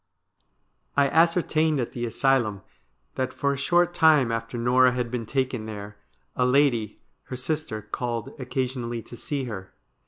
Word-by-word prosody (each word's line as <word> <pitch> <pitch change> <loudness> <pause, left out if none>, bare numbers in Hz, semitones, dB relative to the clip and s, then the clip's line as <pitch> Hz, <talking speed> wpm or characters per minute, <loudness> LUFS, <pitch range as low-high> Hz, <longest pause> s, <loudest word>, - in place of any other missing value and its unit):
' - - -35
I 140 -1 +4
ascertained 160 -2 +3
at 120 - -2
the 120 -1 -3
asylum 115 -4 +1 0.5
that 130 0 -2
for 140 +1 0
a - - -2
short 175 +5 +2
time 155 -8 +5
after 115 +1 -3
Norah 125 +2 +4
had 125 -2 -2
been 120 -3 -3
taken 130 -4 -1
there, 105 -1 -7 0.4
a - - +1
lady, 125 -5 +2 0.3
her 130 - -6
sister, 130 -4 -3
called 115 0 -4
occa 130 0 -1
sionally 120 -2 -4
to - - -10
see 140 +3 -3
her. 100 -6 -7
125 Hz, 160 wpm, -25 LUFS, 115-140 Hz, 0.5 s, time